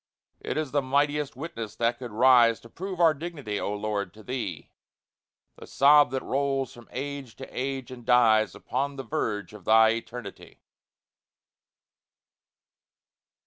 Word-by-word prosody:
It - - -4
is 155 -4 -2
the 145 - +2
mightiest 145 +2 0
witness 115 -7 -6
that 120 0 0
could 125 -2 -6
rise 115 0 +5
To 115 - -14
prove 185 - -6
our 165 -2 +5
dignity, 145 -9 -5
O - - -2
Lord, 105 -2 -3
to 110 - -14
Thee; 115 - -5 0.9
This - - -12
sob 145 +1 +6
that 130 +1 -3
rolls 135 -1 -1
from 120 -1 -15
age 140 -3 -6
to 135 - -8
age, 130 -1 -4
and 125 -1 -10
dies 115 -3 +4
Upon 140 +2 -3
the 135 - -6
verge 105 -4 -3
of 105 -3 -12
Thy 110 +3 +6
Eternity! 115 -1 -6
125 Hz, 145 wpm, -27 LUFS, 110-140 Hz, 0.9 s, sob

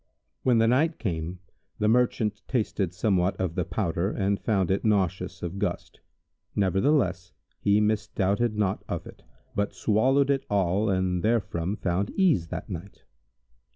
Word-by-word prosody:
When 125 -2 +3
the 115 0 +4
night 150 +7 +2
came, 85 -3 -3 0.4
the 105 - +1
Merchant 110 -3 +2
tasted 105 -7 -1
somewhat 95 0 +1
of 95 -3 -1
the 90 - 0
powder 85 -1 -1
and 100 -1 -1
found 95 -5 +1
it 95 - 0
nauseous 95 -5 0
of 90 +3 -4
gust; - - -3 0.6
nevertheless 95 - +1 0.3
he 100 +1 +3
misdoubted 105 +1 0
not 100 -3 0
of - - -3
it, - - -12 0.3
but 100 +1 -1
swallowed 135 +6 +3
it 135 -1 0
all 100 +1 +1
and 95 -2 0
therefrom 100 -5 0
found 95 0 -1
ease 165 - +3
that - - -6
night. 95 0 -8
100 Hz, 145 wpm, -27 LUFS, 90-110 Hz, 0.6 s, the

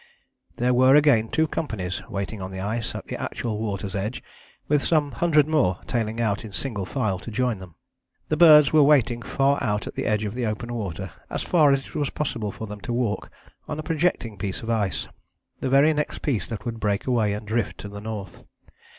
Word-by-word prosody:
There 125 +1 +1
were 130 +2 +6
again 140 -7 +4
two 160 0 +2
companies 110 - -3
waiting 100 +1 -4
on 95 - -5
the 95 0 -6
ice 110 +4 -2
at - - -6
the - - -6
actual 110 -3 -3
water's 100 -3 -3
edge, 105 +5 -3 0.4
with 150 -1 +3
some 150 -3 +2
hundred 150 +2 +3
more 135 - +2
tailing 115 -1 -2
out 110 -3 0
in 105 -3 -9
single 100 -1 -3
file 110 -8 -1
to 115 - -8
join 120 -1 0
them. 90 -4 -12 0.5
The 155 - +1
birds 155 -3 +7
were 155 - +7
waiting 130 -5 +4
far 140 +3 +1
out 105 -3 0
at - - -6
the - - -3
edge 105 0 +1
of 105 -1 -3
the 120 -1 -2
open 120 +3 -4
water, 95 -5 -4 0.2
as - - -3
far 155 -5 +4
as 135 -1 +1
it - - -14
was 145 -2 -1
possible 115 -8 -2
for 110 - -7
them 105 -1 -8
to 120 - -5
walk, 120 -4 -1 0.4
on 150 - -4
a 155 - -4
projecting 155 - -1
piece 95 +1 -4
of 115 - -2
ice, 95 - -1 0.5
the 130 - -2
very 140 +4 +5
next 150 0 -3
piece 130 -8 0
that 115 0 -6
would 115 -1 -4
break 100 -2 0
away 115 -5 +2
and 105 +1 -5
drift 110 +2 -1
to - - -7
the 100 0 -8
north. 105 -4 -7
115 Hz, 215 wpm, -24 LUFS, 105-140 Hz, 0.5 s, birds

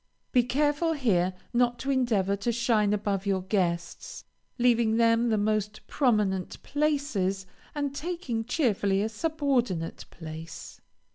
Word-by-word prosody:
Be 250 - +5
careful 295 +6 +1
here 190 - +1 0.2
not 240 0 +2
to 275 - -2
endeavor 220 -7 +1
to 200 +4 -1
shine 225 -3 +2
above 200 -1 -1
your 190 -2 +1
guests, 175 -3 -2 0.3
leaving 235 -2 +3
to - - +1
them 230 0 +3
the 220 - +2
most 210 0 -1
prominent 210 -8 0
places, 280 -11 0 0.3
and 285 -1 -2
taking, 300 -9 -3
cheerfully, 205 - +1
a 220 - -1
subordinate 250 - -1
place. 160 0 -9
225 Hz, 130 wpm, -28 LUFS, 195-260 Hz, 0.3 s, Be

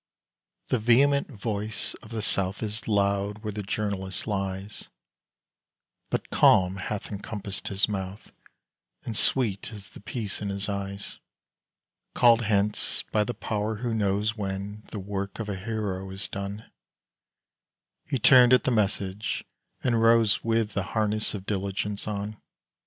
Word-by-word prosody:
The 130 - +2
vehement 140 +5 +4
voice 105 -3 -3
of 110 - -13
the 110 -2 -3
South 95 +1 0
Is 110 +1 -3
loud 100 0 +1
where 105 - -2
the 105 - -3
journalist 100 -2 -2
lies; 100 -1 -3 1.2
But - - -2
calm 95 0 +5
hath 100 +3 -4
encompassed 100 -1 -5
his 100 +1 +3
mouth, 95 -1 -5 0.7
And 115 - -4
sweet 110 -4 +1
is 100 -3 -9
the - - -12
peace 105 0 -4
in 100 - -2
his 100 +1 -2
eyes. 100 0 -4 1.0
Called 120 -1 +6
hence 105 -1 0
by 105 - +3
the 120 +2 -4
Power 105 +1 -2
who 120 +2 -2
knows 105 0 +1
When 100 0 -4
the - - -6
work 100 0 -4
of 110 -2 -4
a 100 - -2
hero 95 -2 -3
is 95 +1 -4
done, 100 +2 -5 1.4
He 140 - 0
turned 125 +1 +7
at 125 - +6
the 130 - +1
message, 100 -2 0 0.4
and 120 -3 +2
rose 115 -2 +5
With 115 -1 +1
the 100 - 0 0.2
harness 110 0 +1
of 95 -2 -7
diligence 100 +1 -2
on. 105 0 -3
105 Hz, 140 wpm, -27 LUFS, 100-110 Hz, 1.4 s, turned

